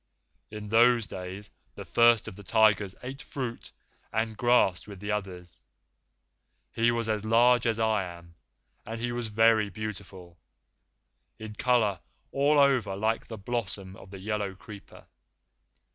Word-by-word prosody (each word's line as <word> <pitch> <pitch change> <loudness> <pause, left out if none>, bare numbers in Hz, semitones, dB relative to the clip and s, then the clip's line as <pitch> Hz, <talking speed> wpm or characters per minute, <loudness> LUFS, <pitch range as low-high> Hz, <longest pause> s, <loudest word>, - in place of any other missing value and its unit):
In 105 -1 -8
those 115 +1 +4
days 95 +2 -8 0.2
the - - -8
First 115 -1 +4
of 110 - -7
the 105 - -11
Tigers 100 -2 +3
ate 135 +3 -7
fruit 125 -5 -6 0.4
and 110 0 -1
grass 120 -7 +2
with 100 -3 -10
the 105 +2 -4
others. 90 -4 -5 1.1
He 115 +1 +2
was 115 -1 -1
as 110 -2 -1
large 120 +2 +4
as 115 -1 +1
I 110 -3 +1
am, 85 -1 -11 0.5
and 115 +1 -6
he 120 +1 -2
was 120 -1 -3
very 110 -1 +3
beautiful, 95 -4 -8 1.0
in 110 -1 -8
colour 110 -3 +1 0.3
all 145 +2 +2
over 130 -8 +3
like 110 +3 -1
the 110 - -7
blossom 100 -3 -4
of 95 - -14
the 100 - -9
yellow 100 0 -3
creeper. 100 +1 -13
110 Hz, 145 wpm, -28 LUFS, 100-115 Hz, 1.1 s, those